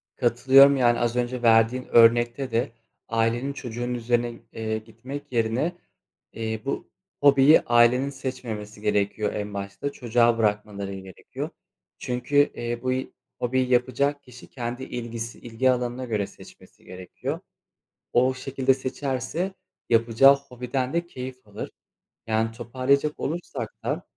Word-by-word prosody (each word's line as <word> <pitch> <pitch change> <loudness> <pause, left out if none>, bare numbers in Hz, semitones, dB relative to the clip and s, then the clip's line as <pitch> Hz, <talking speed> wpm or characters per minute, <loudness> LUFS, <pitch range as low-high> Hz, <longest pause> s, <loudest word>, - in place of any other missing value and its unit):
Katılıyorum. 135 +3 +6
Yani 120 -2 +3
az 120 0 0
önce 125 0 -1
verdiğin 115 +2 +4
örnekte 120 +3 +4
de 115 +3 0 0.4
ailenin 115 +4 0
çocuğun 120 -1 -4
üzerine, 120 0 -1
eee, 110 -1 -2
gitmek 120 +6 -9
yerine, 120 +9 0 0.6
eee, 110 -1 -4
bu 140 - -3 0.3
hobiyi 140 +1 +7
ailenin 120 +3 +4
seçmemesi 115 -6 -6
gerekiyor 105 0 0
en 105 0 -4
başta, 100 +8 -4
çocuğa 120 -2 +2
bırakmaları 105 -2 -1
gerekiyor. 95 -2 -7 0.5
Çünkü, 125 +3 -4 0.2
eee, 120 0 -4
bu 130 - 0
y 130 +1 -2 0.3
hobiyi 130 +1 0
yapacak 130 +3 +1
kişi 125 0 -14
kendi 120 0 -5
ilgisi 115 -2 -5
ilgi 120 +2 +1
alanına 125 +1 -2
göre 105 -4 -1
seçmesi - - -17
gerekiyor. 90 0 -6 0.7
O 130 +2 +3
şekilde 135 0 +1
seçerse 135 +7 -3 0.4
yapacağı 115 +4 +6
hobiden 130 -1 -4
de 170 +1 -1
keyif 130 -6 -8
alır. 105 0 -7 0.6
Yani 110 0 +1
toparlayacak 130 +6 0
olursak 170 +4 -4
da - - -2
120 Hz, 125 wpm, -25 LUFS, 115-130 Hz, 0.7 s, hobiyi